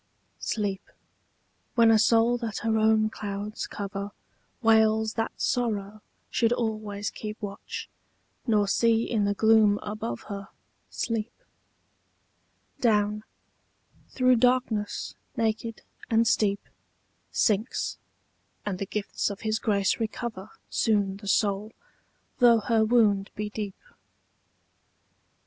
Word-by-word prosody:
SLEEP, 200 -3 -2 0.9
when 230 -2 +6
a 220 - +5
soul 230 +2 +4
that 230 -3 -4
her 225 -1 +2
own 220 0 +4
clouds 205 0 -5
cover 200 0 -5 0.5
Wails 220 -1 +4
that 225 -1 -3
sorrow 215 -4 -1 0.3
should 230 -1 +2
always 215 -4 -2
keep 215 0 -7
Watch, 200 -2 -6 0.6
nor 210 -3 +3
see 230 +2 +3
in 215 -4 0
the 205 0 0
gloom 220 -1 +5
above 205 - -4
her 200 -1 -7 0.4
Sleep, 225 0 -2 1.5
Down, 210 -2 +2 0.9
through 255 -1 +3
darkness 245 -4 +1 0.2
naked 225 0 -1 0.3
and 230 0 +3
steep, 205 -3 +2 0.7
Sinks, 215 +2 0 0.7
and 195 -3 -3
the 195 - -3
gifts 210 +1 -2
of 200 - -7
his 220 0 0
grace 200 -2 +1
recover 220 -2 -4 0.2
Soon 200 -3 +1
the 200 0 -11
soul, 205 +1 +1 0.7
though 235 -3 +6
her 225 0 +2
wound 215 -4 +3
be 210 0 -4
deep. 205 -3 -5
215 Hz, 110 wpm, -27 LUFS, 205-225 Hz, 1.5 s, when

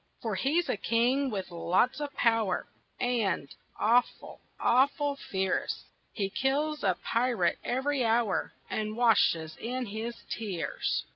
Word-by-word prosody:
For 225 -2 -1
he's 285 - +1
a - - 0
king 245 +6 +2
with 195 -5 -4
lots 175 - +1
of 290 -1 -3
power 225 -5 +2 0.3
And 225 - 0 0.3
awful, 240 +3 +1 0.2
awful 280 +3 +3
fierce, 190 -7 -2 0.3
He 195 -3 -2
kills 295 +6 0
a 185 -3 +2
pirate 230 -7 +1
every 265 +2 0
hour 225 -3 +1 0.2
And 215 0 -3
washes 170 -9 +3
in 250 +2 -3
his 225 +3 -4
tears. 200 -7 -2
230 Hz, 125 wpm, -29 LUFS, 195-255 Hz, 0.3 s, awful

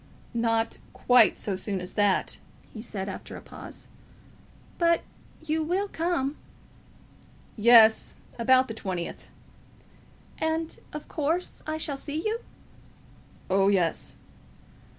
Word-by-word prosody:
"Not 230 -1 0
quite 245 -5 +5
so 200 - -2
soon 190 +1 -3
as 180 0 -7
that," 205 -2 +1 0.3
he 220 - -7
said, 200 -4 -5
after 195 - -7
a - - -10
pause. - - -10 0.9
"But 335 -1 +3 0.4
you 315 +1 0
will 365 +6 0
come?" 320 -6 -1 1.2
"Yes; 225 0 +6 0.2
about 260 +2 +5
the 225 - -5
twentieth." 185 -6 -5 1.1
"And, 320 +1 -1
of 300 - -7
course, 320 +4 -2
I 310 0 -1
shall 290 -3 -3
see 295 +2 -4
you?" 440 +2 0 1.1
"Oh, 195 +1 +3
yes." 180 -5 +1
245 Hz, 110 wpm, -27 LUFS, 205-315 Hz, 1.2 s, Yes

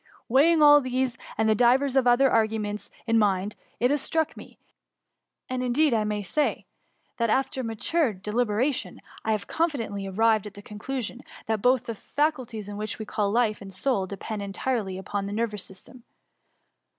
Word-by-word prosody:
Weighing 305 +6 +5
all 290 0 +8
these 255 -1 -1 0.2
and 220 0 +3
divers 255 +4 +3
other 260 +1 +4
arguments 215 -2 0 0.2
in 230 -1 +3
my 205 -2 +4
mind, 205 +2 -6 0.2
it 245 +2 +3
has 290 -1 +1
struck 320 +1 0
me, - - -13 0.9
and 255 0 -3
indeed 255 +3 +2
I 215 -2 +1
may 210 -1 -2
say, 295 +10 -1 0.5
that 230 -1 +1
after 265 +2 0
mature 240 +6 +1
deliberation, 215 +6 -1 0.2
I 220 - 0
have 210 -2 -2
confident 295 -10 -1
ly 200 -1 -4
arrived 215 +1 +2
at 210 - -11
the 205 - -11
conclusion, 245 +4 -5 0.2
that 220 -2 -1
both 250 +1 +3
the 230 - -3
fa 295 +8 0
culties 220 -7 -8
which 215 +1 -4
we 220 - -6
call 205 -1 -1
life 220 -1 +1
and 195 -1 -9
soul 195 0 -1
depend 205 +2 -5
en 200 -1 -5
tirely 210 -6 -2
upon 200 +1 -3
the 200 - -5
nervous 210 -2 -2
system. 230 +6 -12
225 Hz, 175 wpm, -26 LUFS, 210-260 Hz, 0.9 s, all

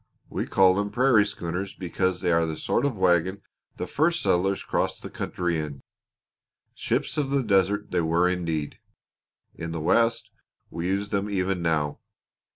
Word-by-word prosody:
We - - -2
call 95 -1 +5
them 100 +2 -1
prairie 120 -3 +4
schooners 90 +2 -4
because 95 0 -1
they 90 - +1
are 85 -1 +3
the 80 -1 -4
sort 140 - 0
of 135 - -3
wagon 95 +2 +2 0.3
the - - -3
first 165 +3 +1
settlers 95 +2 +1
crossed - - -1
the - - -7
country 85 -2 -2
in. 75 -3 -6 0.9
Ships - - -1
of 140 -2 -1
the 140 -1 +1
Desert 100 -1 +1
they 90 - +2
were 85 +2 +2
indeed! 80 -5 -2 0.7
In 85 0 -6
the 85 - -3
West 115 +9 +2 0.4
we 85 +1 -3
use 100 +2 -1
them 100 +1 -1
even 95 -2 -1
now. 75 -3 0
95 Hz, 160 wpm, -26 LUFS, 85-100 Hz, 0.9 s, call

